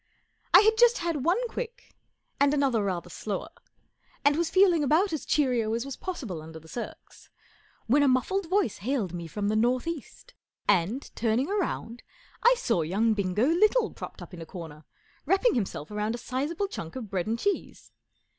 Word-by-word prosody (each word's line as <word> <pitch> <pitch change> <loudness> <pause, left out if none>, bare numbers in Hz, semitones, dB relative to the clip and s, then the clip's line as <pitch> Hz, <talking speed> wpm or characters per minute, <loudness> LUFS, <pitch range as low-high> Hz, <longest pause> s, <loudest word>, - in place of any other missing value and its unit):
I - - +9
had 440 +1 +3
just 480 0 +6
had 335 -6 -2
one 395 - +2
quick 485 +1 -7 0.5
ami 285 +1 +4
another 265 -7 +2
rather 175 -3 -3
slower, 205 - -4 0.7
and 285 0 +5
was 335 0 0
feeling 360 -4 +4
about 325 +7 +2
as 310 - -4
cheerio 245 -7 +2
as 235 +2 -2
was 275 - -5
possible 245 - -5
under 160 +1 -10
the 160 - -17
circs, 235 +8 -9 0.6
when 275 +6 +4
a 285 - +4
muffled 325 +8 +1
voice 375 - +1
hailed 215 -4 -1
me 170 -1 -5
from 200 +5 -3
the 215 - +1
north 245 +3 +2
east, 335 - -7 0.3
and, 200 +10 +1
turning 235 +6 +1
round, 340 - -2 0.4
I - - +6
saw 465 - +1
young 205 +8 +1
Bingo 200 +2 +1
Little 430 - +3
propped - - -9
up - - -13
in 170 - -8
a - - -6
corner, 160 -4 -9 0.4
wrapping 390 +7 +3
himself 190 -8 -3
round 210 +2 -1
a - - -5
sizable 290 +11 -2
chunk 165 - -7
of 230 -6 -6
bread 185 -1 -1
and 225 +1 0
cheese. 405 +9 -3
255 Hz, 180 wpm, -27 LUFS, 205-345 Hz, 0.7 s, I